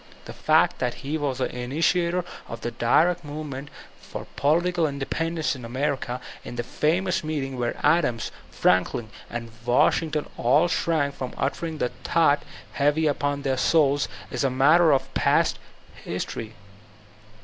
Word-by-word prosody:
The - - -8
fact - - +3
that 125 -1 -1
he 145 +3 -1
was 145 -4 -1
the 130 - -2
initiator 170 +7 +1 0.2
of 115 - -7
the 120 - -3
direct 165 +11 +2
movement 145 -2 -6 0.3
for - - -7
political 170 +3 +2
independence 155 +3 -2
in 130 - -10
America, 130 0 -2 0.2
in - - -7
the 120 - -2
famous 170 +9 0
meeting 145 -4 -3
where 120 -1 -2
Adams, 150 -8 +2 0.2
Franklin 95 +5 +1 0.2
and 115 -1 -6
Washington 150 +5 +2
all 145 +8 +4
shrank 155 -4 0
from 130 -2 -6
uttering 160 +3 -2
the 125 - 0
thought 150 -1 +2 0.3
heavy 145 +3 +2
upon 145 -1 0
their 135 -2 0
souls, 145 -1 +3 0.2
b - - -4
a 135 - +3
matter 155 +6 +5
of 135 - +1
past - - +2 0.4
history. 110 0 -5
145 Hz, 140 wpm, -25 LUFS, 125-160 Hz, 0.4 s, matter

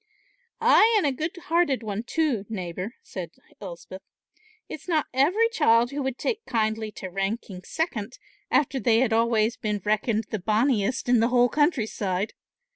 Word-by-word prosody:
"Ay 460 -1 +5
and 400 - +2
a 285 - +2
good 315 +6 -4
hearted 310 -6 +1
one 210 -1 -3
too, 260 -4 0
neighbour," 185 +1 -5
said - - -6 0.3
Elspeth. - - -9 0.7
"It's 310 - -9
not 315 -4 +1
every 350 - +3
child 240 - +3
who 285 +1 -3
would 265 -2 -2
take 450 -1 -2
kindly 220 -2 -1
to 190 - -7
ranking 195 0 -3
second 250 - -3 0.3
after 270 -2 +2
they 230 0 +3
had 245 -4 +2
always 230 0 +2
been 210 -2 -2
reckoned 215 +1 +1
the 215 - -2
bonniest 220 +4 +1
in 245 -1 +4
the 230 - +3
whole 245 0 +3
countryside. 220 - 0
235 Hz, 155 wpm, -25 LUFS, 215-295 Hz, 0.7 s, Ay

